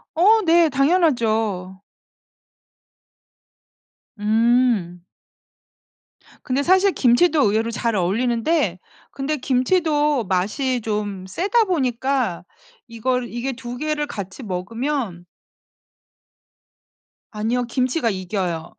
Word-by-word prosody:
어 425 +6 +5
네. 335 -1 +5
당연하죠. 225 - +1 2.4
음. 220 -5 +1 1.4
근데 265 +2 0
사실 375 +3 +4
김치도 285 +5 +3
의외로 225 +2 0
잘 230 0 -1
어울리는데 225 - 0 0.3
근데 280 +3 -3
김치도 295 0 +1
맛이 215 +8 -1
좀 205 -3 -4
세다 390 - +1
보니까 260 - -1 0.4
이걸 245 +2 -2
이게 240 +3 -4
2 245 0 -7
개를 300 +1 -2
같이 200 +1 -7
먹으면 210 0 -4 2.1
아니요. 225 +4 -1
김치가 255 +1 0
이겨요. 185 -3 -4
240 Hz, 180 characters per minute, -21 LUFS, 210-290 Hz, 2.4 s, 어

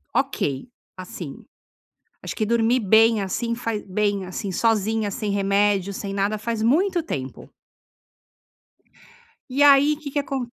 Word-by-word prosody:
ok, 135 - -1 0.3
assim, 175 -5 -8 0.8
acho - - -5
que 215 - -1
dormir 235 +2 +2
bem 220 +1 +4
assim, 230 +5 -2
fa 230 -1 -3 0.2
bem, 200 0 -1
assim, 190 +2 -5
sozinha, 220 +1 +1
sem 205 +1 -3
remédio, 200 0 +1
sem 195 0 -5
nada, 200 +2 0
faz 220 +1 -3
muito 345 - +2
tempo 130 - -6 2.0
e 270 +3 +1
aí 285 +1 +6
que 290 -2 -8
que 290 - -2
acon 275 -2 -2
215 Hz, 130 wpm, -23 LUFS, 195-245 Hz, 2.0 s, aí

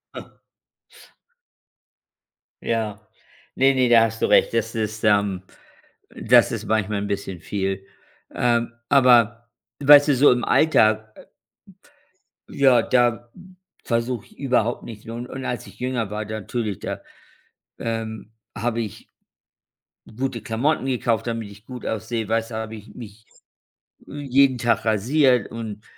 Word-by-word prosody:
Ah. - - -10 2.3
Ja. 110 -2 -2 0.5
Ne, 135 +1 +4
ne, 130 -2 +2
da 115 -1 +7
hast 115 0 -3
du - - +3
recht. - - +4
Das 115 -1 -1
ist, 110 0 -3
ähm 100 -3 +2 0.7
das - - +4
ist - - -4
manchmal 105 -1 0
'n 100 - -3
bisschen 100 -3 -4
viel. 95 0 -3 0.5
Ähm. 120 -1 +1 0.2
Aber 120 -3 +4 0.3
weißt 145 +1 +7
du, 140 - +4
so 140 +3 +6
im 125 -1 0
Alltag, 110 -8 +3
äh - - -15 1.2
ja, 130 -4 +4
da, 120 -1 +1
hm, 185 0 -16 0.3
versuche 115 -1 -2
ich - - -23
überhaupt 125 -4 0
nicht 110 -1 -10
un 120 +2 -6
und 130 +1 -7
als 125 - -4
ich - - -16
jünger 125 -4 -2
war, 105 +1 -4
natürlich 110 -1 -4
da, - - -5 0.8
ähm, 110 -2 -5 0.2
habe 115 +1 -2
ich 110 -3 -7 1.1
gute 130 -3 -3
Klamotten 125 +7 -1
gekauft, 120 -4 -1
damit 115 -3 -4
ich 100 +1 -16
gut 125 0 -9
aussehe. 110 0 -3
Weißt 115 +1 -1
du, - - -7
da 110 - -2
habe 110 0 -7
ich 105 0 -13
mich, 110 -2 -12 0.8
äh, 145 - -8
jeden 135 -1 +3
Tag 115 -1 0
rasiert 125 +2 +2
und 110 -2 -7
115 Hz, 140 wpm, -22 LUFS, 110-125 Hz, 2.3 s, da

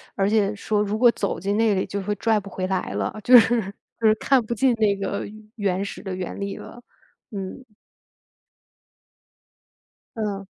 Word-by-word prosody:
而 195 0 +1
且 210 -1 +2
说 210 +1 -1
如 210 +1 -2
果 240 +1 +6
走 200 -4 -3
进 200 +2 -1
那 225 -1 +3
里， 190 -1 0
就 200 - -4
会 210 +2 -1
拽 220 +1 +1
不 200 0 -10
回 185 0 -3
来 190 0 -2
了， - - -2
就 250 +3 +9
是 225 - +3 0.5
就 225 - +3
是 215 - +6
看 270 -3 +3
不 235 - -2
进 250 +3 +3
那 215 -3 +2
个 195 0 -3 0.3
原 195 -3 -1
始 200 - -7
的 190 -2 -4
原 185 +1 -5
理 200 0 -4
了， 240 - -11 0.5
嗯。 195 +5 -6 2.5
嗯。 205 -3 -3
205 Hz, 185 characters per minute, -23 LUFS, 195-220 Hz, 2.5 s, 就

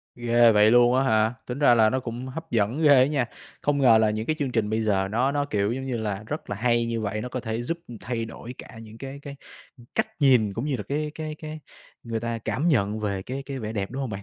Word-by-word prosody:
Ghê 120 -1 +4
vậy 105 +1 +5
luôn 120 +1 +5
á 135 - +3
hả, 110 -2 +2
tính 125 +3 -5
ra 130 -4 +6
là 110 -2 +5
nó 130 - 0
cũng 125 +1 -6
hấp 160 +5 -8
dẫn 115 +7 +1
ghê 145 -3 +7
á 130 - +6
nha. 140 -4 0 0.4
Không 145 0 +1
ngờ 115 -4 +7
là 110 -1 +3
những 110 +1 -2
cái 155 - 0
chương 140 -3 -1
trình 110 -3 0
bây 110 +1 0
giờ 95 -3 +1
nó 125 +5 +1
nó, 145 0 0
kiểu, 105 -4 0
giống 130 +2 -4
như 125 -3 -2
là, 105 -2 -3
rất 150 - -5
là 100 - -2
hay 120 +1 +1
như 115 -1 -2
vậy, 105 0 -2
nó 125 - -5
có 130 - -3
thể 115 -1 -3
giúp 165 +6 -3 0.2
thay 115 -2 -3
đổi 115 +2 -9
cả - - -11
những 110 0 -12
cái 135 +3 -8
cái 140 -1 -8 0.6
cách - - +1
nhìn, 125 -7 +4
cũng 115 +6 -4
như 140 - 0
là 105 - -5
cái 150 +7 -3
cái 155 -1 -5
cái 155 0 -7 0.4
người 115 -2 -3
ta 115 -1 -3
cảm 145 +8 -1
nhận 110 -7 +1
về 100 -3 -2
cái 135 +6 -5
cái 140 -1 -5
vẻ 110 -3 -5
đẹp, 100 -3 -3
đúng 130 +3 -5
hông 130 -4 -3
bạn? 100 0 -6
120 Hz, 275 wpm, -25 LUFS, 110-135 Hz, 0.6 s, ghê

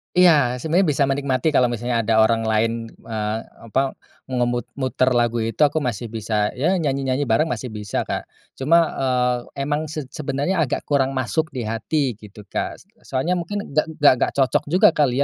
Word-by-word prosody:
Iya, 150 -9 +5
sebenarnya 165 +6 +2
bisa 140 0 +1
menikmati 135 +2 0
kalau 125 -1 +4
misalnya 120 0 -1
ada 110 0 +3
orang 115 +1 +3
lain, 110 +1 +2 0.3
eee, 110 -1 -3 0.3
apa 135 +2 0 0.3
mengemut 120 -2 -1
muter 130 -1 0
lagu 120 -1 +2
itu 115 +4 -3
aku 150 +2 +3
masih 120 -4 -3
bisa 105 -2 -1
ya 160 +9 +1
nyanyi-nyanyi 140 -4 0
bareng 120 +6 +2
masih 125 0 -4
bisa, 105 -2 -3
Kak. - - -4 0.3
Cuma, 165 +4 +4
eee, 125 -2 +1 0.3
emang 150 +2 -1
se 155 0 -5
sebenarnya 155 +4 -2
agak 145 -5 0
kurang 135 -2 +1
masuk 145 +5 0
di 125 - -2
hati 120 +6 -1
gitu, 105 0 -13
Kak, 100 - -3
s - - -18 0.2
soalnya 160 +8 0
mungkin 205 +4 -4
nggak 155 +3 +2 0.3
nggak - - +1
cocok 135 -2 +2
juga 175 +3 +5
kali 140 -3 +2
130 Hz, 175 wpm, -22 LUFS, 115-150 Hz, 0.3 s, Iya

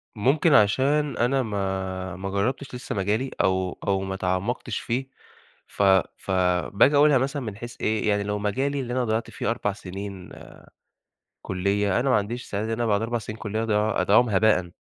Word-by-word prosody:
ممكن 140 +8 +3
عشان 135 +7 +3
أنا 130 +2 +2
ما 95 -3 -3
ما 95 +1 -5
جرّبتش 125 +7 -2
لسه 125 -1 -5
مجالي 105 +7 -1
أو 95 -1 0
أو 95 -1 +1
ما 95 0 -4
تعمّقتش 95 +6 -2
فيه 130 +3 -2 0.6
ف - - -4 0.3
فباجي 95 +8 +2
أقولها 145 -2 +6
مثلًا 135 +2 -2
من 105 -4 -6
حيث 120 +1 -8
إيه، 110 0 0
يعني 100 -1 +2
لو 105 0 -2
مجالي 135 +8 -1
اللي 125 -2 -4
أنا 125 -1 0
ضيّعت 110 0 -1
فيه - - -2
4 105 -3 -1
سنين 95 -1 -8 1.1
كُليّة، 100 +3 0
أنا 135 +2 0
ما 125 - +4
عنديش 115 +4 -2
استعداد 105 +2 -3
إن 115 - 0
أنا 120 +1 -1
بعد 105 -1 +1
4 120 +1 -1
سنين 110 +1 -7
كُليّة 110 +1 -2
أضيع 105 -1 +1
أضيّعهم 110 +4 +4
هباءًا. 95 -4 +2
105 Hz, 175 wpm, -25 LUFS, 100-125 Hz, 1.1 s, أقولها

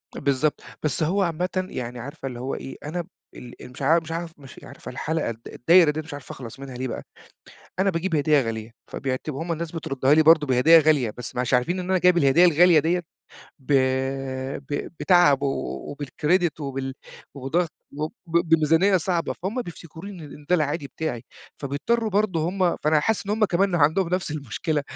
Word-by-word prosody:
بالضبط. 140 +2 0 0.2
بس 150 +1 0
هو 190 +6 +1
عامةً 175 0 -1 0.2
يعني 125 0 -5
عارفة 135 +2 -7
اللي 125 -2 -6
هو 130 +2 -3
إيه، 135 - -7
أنا 175 +4 -3
ب 170 - -13 0.3
ال 125 -1 -11
ال 125 - -10
مش 135 - -12
عارف 165 +5 +4
مش 160 - -9
عارف 165 0 -4
مش 135 -1 -13
عارفة - - -10
الحلقة 155 +3 -2
الد 115 0 -7
الدايرة 165 +3 +4
دي 150 - -4
مش 155 -1 -10
عارف 145 -2 -9
أخلص 125 0 -9
منها، 135 -2 -8
ليه 130 +1 -3
بقى؟ - - -5 0.8
أنا 195 +1 +3
باجيب 165 0 -1
هديّة 150 0 +3
غالية، 110 0 -5 0.2
فبيعتب 135 +2 -3
هم 165 +4 -3
الناس 165 0 -4
بتردّها 140 -4 +1
لي 160 - +5
برضه 155 -1 +6
بهدية 135 +6 +6
غالية، 150 -7 +3
بس 125 - -7
مش 125 +1 0
عارفين 170 +10 +1
إن 180 +1 -5
أنا 185 - +3
جايب 180 0 +4
الهدية 155 +2 +5
الغالية 175 0 +6
ديّة 170 +4 +1 0.6
ب 140 +1 -4 1.0
ب 145 - -3
بتعب 175 -7 +4
و 140 +1 -3
وبالCredit 155 +4 0
وبال 135 -2 -4 0.4
وبضغط 155 +5 -1 0.2
وب 155 +1 -3
وبميزانية 165 +3 +3
صعبة، 175 -1 -1
فهُم 225 +7 -2
بفتكروني 175 0 -10
إن 145 0 -12
ده 180 - +4
العادي 150 -2 0
بتاعي. 135 -7 -4 0.4
فبيضطرّوا 215 - -1
برضه 185 -5 +1
هم 185 -2 +1
فأنا 155 0 +3
حاسِس 210 +3 -1
إن - - -3
هم 215 +1 +2
كمان 190 0 +1
عندهم 165 +3 +3
نفس 180 -2 -1
المشكلة، 145 - -2
155 Hz, 185 wpm, -24 LUFS, 135-175 Hz, 1.0 s, برضه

